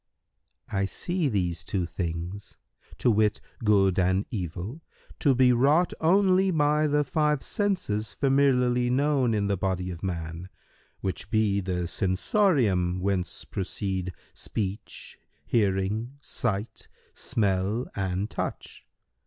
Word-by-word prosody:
Q - - -4
"I 100 - +2
see 170 - -1
these 90 -6 -1
two 90 +1 -1
things, 85 +3 -5 0.4
to 120 - +3
wit, 105 -1 +2 0.2
good 95 -3 +4
and 95 +2 +2
evil, 95 - -5 0.4
to 140 -3 +3
be 125 0 +5
wrought 145 +8 +3
only 190 +2 +4
by 150 -2 +2
the 150 0 +2
five 150 -1 +1
senses 140 - -1
familiarly 125 -3 +2
known 135 -3 +2
in 105 -1 +1
the 100 -1 0
body 90 -1 -1
of 85 -1 -8
man, 85 -1 -4 0.5
which 95 0 -3
be 105 -2 +2
the 90 -2 -2
sensorium[FN#132] 95 - +1
whence 95 -1 -2
proceed 95 -1 -3 0.2
speech, 100 -2 -5 0.3
hearing, 105 +4 0
sight, 115 -6 -3 0.3
smell 100 +3 0
and 95 +1 -2
touch. - - -5
105 Hz, 120 wpm, -27 LUFS, 95-135 Hz, 0.5 s, be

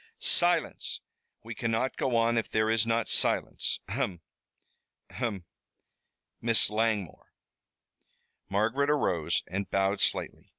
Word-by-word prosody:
"Silence. - - +1 0.4
We 115 +1 -7
cannot 115 +3 -1
go 130 -3 -1
on 115 0 +3
if 110 - -5
there 110 0 +1
is 115 0 +2
not 115 0 +1
silence. - - +1
Ahem! 90 -3 -3 0.9
ahem! 100 -7 -4 1.0
Miss 115 -2 +3
Langmore!" 105 -4 -1 1.2
Margaret 115 +8 +1
arose 95 - +1
and 95 +3 -4
bowed 95 +1 +1
slightly. - - -1
110 Hz, 110 wpm, -29 LUFS, 100-115 Hz, 1.2 s, on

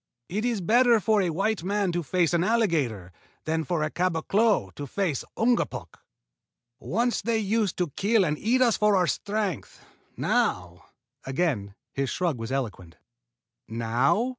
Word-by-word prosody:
"It 210 +6 -2
is 235 -5 0
better 235 +5 +4
for 215 0 +2
a 180 - 0
white 195 +3 -1
man 200 0 0
to 175 0 -1
face 175 +1 +1
an 170 0 +2
alligator 160 - 0 0.3
than 160 +1 0
for 170 -2 -1
a 155 - -2
caboclo 180 - +1
to 145 - -7
face 165 -3 -1
an 225 - +1
Ungapuk. - - -5 0.8
Once 235 +4 0
they 225 +2 0
used 215 -1 0
to 175 -5 -1
kill 205 - +2
and 150 - 0
eat 250 +4 +3
us 235 -3 +3
for 210 -1 +3
our 185 -1 +3
strength. 205 -2 -3 0.3
Now 90 -1 -1 0.2
" 130 +3 -53
Again 130 - -1 0.2
his 135 -1 -1
shrug 165 -2 -1
was 115 +2 -5
eloquent. 105 -11 -4 0.7
"Now?" 120 - +1
180 Hz, 160 wpm, -26 LUFS, 135-215 Hz, 0.8 s, better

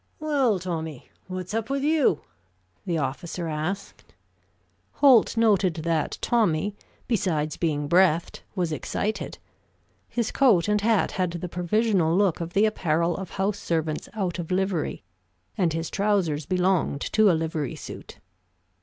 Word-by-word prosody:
"Well, 280 -8 +2
Tommy, 160 -6 -5 0.2
what's 185 +1 -5
up 225 +1 -2
with 275 0 -1
you?" 295 - +3 0.7
the 170 -2 0
officer 160 +5 -3
asked. 160 +6 -5 0.8
Holt 255 -5 +5
noted 200 -6 +3
that 160 -1 -1
Tommy, 205 -4 +1 0.3
besides 165 - 0
being 150 -3 -1
breathed, 175 0 +3
was 175 -4 -1
excited. 210 +7 -3 0.7
His 235 -2 -1
coat 220 -11 +4
and 210 0 +2
hat 220 -1 +2
had 180 -2 -1
the 175 +1 -4
provisional 180 -1 +1
look 195 -5 +2
of 170 +1 -5
the 205 +2 +4
apparel 170 -5 +1
of 190 -1 -6
house 200 +1 -1
servants 160 -2 -2
out 185 -4 -2
of 165 - -5
livery, 185 -2 -1 0.5
and 180 -6 +1
his 165 0 -3
trousers 190 -8 0
belonged 180 -5 +1
to 215 -1 +5
a 170 - +3
livery 160 -4 -3
suit. - - -9
180 Hz, 135 wpm, -25 LUFS, 165-210 Hz, 0.8 s, Holt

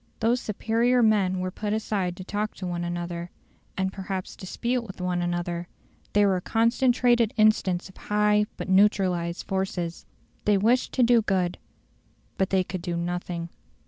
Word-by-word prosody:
Those 235 +2 +2
superior 235 +4 +1
men 195 -4 +2
were 185 0 -2
put 210 +2 -3
aside 195 -5 -1
to 185 - -7
talk 210 +3 -3
to 190 - -6
one 175 -1 -3
another, 175 0 -4 0.5
and 190 0 -1
perhaps 190 -1 -5
dispute 240 +6 -2
with 200 -5 -10
one 180 -1 -1
another; 175 0 -2 0.5
they 205 0 +5
were 190 -2 +3
a - - -4
concentrated 240 +1 +2
instance 205 -5 +3
of 190 - -17
high 210 0 +2
but - - -5
neutralised 185 -3 +2
forces. 190 -3 -3 0.4
They 210 -1 +4
wished 235 +6 +2
to 255 - +3
do 235 -1 +5
good, 185 -4 0 0.8
but 190 - +2
they 190 -1 +2
could 180 0 -5
do 170 0 -3
nothing. 175 0 -3
190 Hz, 160 wpm, -26 LUFS, 180-215 Hz, 0.8 s, they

